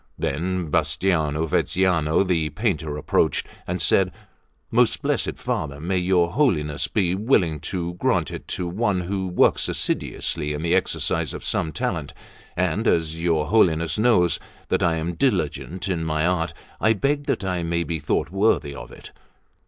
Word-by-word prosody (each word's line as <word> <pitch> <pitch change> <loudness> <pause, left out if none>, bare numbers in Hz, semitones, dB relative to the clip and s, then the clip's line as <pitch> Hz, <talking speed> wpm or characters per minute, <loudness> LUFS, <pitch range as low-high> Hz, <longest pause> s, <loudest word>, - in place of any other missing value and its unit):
Then 85 +2 -2
Bastiano 80 0 +1
Veneziano 85 0 +2
the 85 -5 0
painter 80 - -2
approached, - - +1 0.2
and - - -2
said: - - +3 0.6
"Most - - +3
blessed - - 0
Father, 70 -2 -3
may 90 +4 -1
your 90 -1 +2
Holiness 80 - +1
be 90 +3 +1
willing 95 - +2
to 85 +2 -4
grant 90 - 0
it - - -8
to 90 - -3
one 95 +1 0
who 95 +1 -2
works 90 - +2
assiduously 75 0 -2
in 75 +2 -4
the 85 +1 +1
exercise 95 - 0
of - - -8
some 80 - 0
talent; - - -3 0.4
and 90 +5 0
as 80 0 +1
your 80 -3 +1
Holiness 85 -4 +3
knows 105 -8 +3 0.3
that - - +1
I 85 -1 +2
am 80 +2 -2
diligent 90 +2 -1
in 85 -4 -1
my 75 0 0
art, 90 -1 0 0.2
I 110 - +4
beg 145 +7 0
that - - -1
I 90 -2 -1
may 85 0 0
be 85 -1 -3
thought 75 +2 -1
worthy 95 -7 +1
of - - -9
it." - - -12
85 Hz, 160 wpm, -23 LUFS, 80-95 Hz, 0.6 s, I